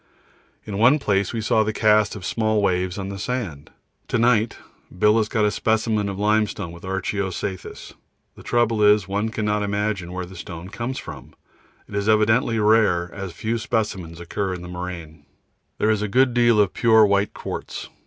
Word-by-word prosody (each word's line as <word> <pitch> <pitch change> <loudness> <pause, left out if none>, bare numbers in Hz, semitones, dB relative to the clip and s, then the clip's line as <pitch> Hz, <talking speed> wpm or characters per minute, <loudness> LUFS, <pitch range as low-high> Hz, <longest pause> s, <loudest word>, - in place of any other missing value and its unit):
In 100 -1 -4
one 125 +7 +6
place 100 -8 0
we 115 - -3
saw 110 0 +2
the 110 0 0
cast 110 -1 +3
of 95 -3 -8
small 110 -1 0
waves 90 -2 0
on 95 -1 -4
the 100 0 -6
sand. 95 - -4 0.4
To - - 0
night 115 -1 +2 0.4
Bill 105 +4 +4
has 110 -1 +1
got 110 -3 +1
a 105 - +2
specimen 110 -1 0
of 95 - -5
limestone 105 -3 0
with 85 +1 -12
archeo 95 0 -2
cyathus 95 +1 -6 0.4
the - - -13
trouble 115 -2 +1
is 105 -2 +4
one 100 +3 -1
cannot 105 -1 -1
imagine 100 -3 -2
where 90 0 -4
the 95 +2 -13
stone 85 0 -8
comes 120 +4 -4
from; - - -9 0.5
it - - -14
is 100 +1 -1
evidently 110 +2 +3
rare, 105 -5 +3
as 95 -2 -6
few 110 +6 -2
specimens 105 -8 -3
occur 95 +2 -3
in 90 - -9
the - - -8
moraine. 90 -4 -7 0.5
There 110 - +2
is 105 -1 0
a 105 - -1
good 130 +4 +3
deal 120 -2 +4
of 100 -3 +3
pure 110 -2 +5
white 100 0 +1
quartz. - - -6
105 Hz, 185 wpm, -22 LUFS, 95-110 Hz, 0.5 s, one